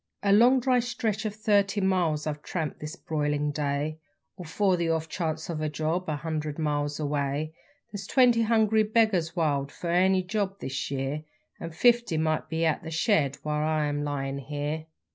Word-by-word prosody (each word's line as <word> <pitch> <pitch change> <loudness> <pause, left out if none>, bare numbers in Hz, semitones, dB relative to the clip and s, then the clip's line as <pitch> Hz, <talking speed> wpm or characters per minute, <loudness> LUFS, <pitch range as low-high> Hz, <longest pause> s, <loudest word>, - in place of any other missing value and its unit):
A 200 -1 +4
long 245 +5 +6
dry 250 0 +2
stretch 225 -3 -2
of 210 -1 -3
thirty 205 -2 +2
miles 180 -6 +1
I've 150 -1 -3
tramped 160 -2 -4
this 150 +2 -6
broilin' 150 -3 -1
day, 145 +1 -2 0.4
All 180 -1 -9
for 190 +4 +1
the 170 -1 -1
off 160 -1 0
chance 160 -1 -3
of 160 -3 -4
a 155 - 0
job 160 +4 -2
a 155 - 0
hundred 155 -1 -4
miles 145 -2 -1
away; 145 +1 -1 0.4
There's 200 -1 -6
twenty 245 -3 +4
hungry 220 -1 +3
beggars 210 -7 +2
wild 145 -4 0
for 170 - -4
any 185 +1 +3
job 195 0 -2
this 135 0 -4
year, 140 +2 -3 0.4
An' 165 - -5
fifty 235 +1 +3
might 155 0 0
be 165 0 0
at 160 - +1
the 160 - -7
shed 160 - +1
while 150 0 -1
I 155 -1 +1
am 145 0 -1
lyin' 140 -1 -3
here. 150 +3 -4
160 Hz, 180 wpm, -27 LUFS, 150-200 Hz, 0.4 s, long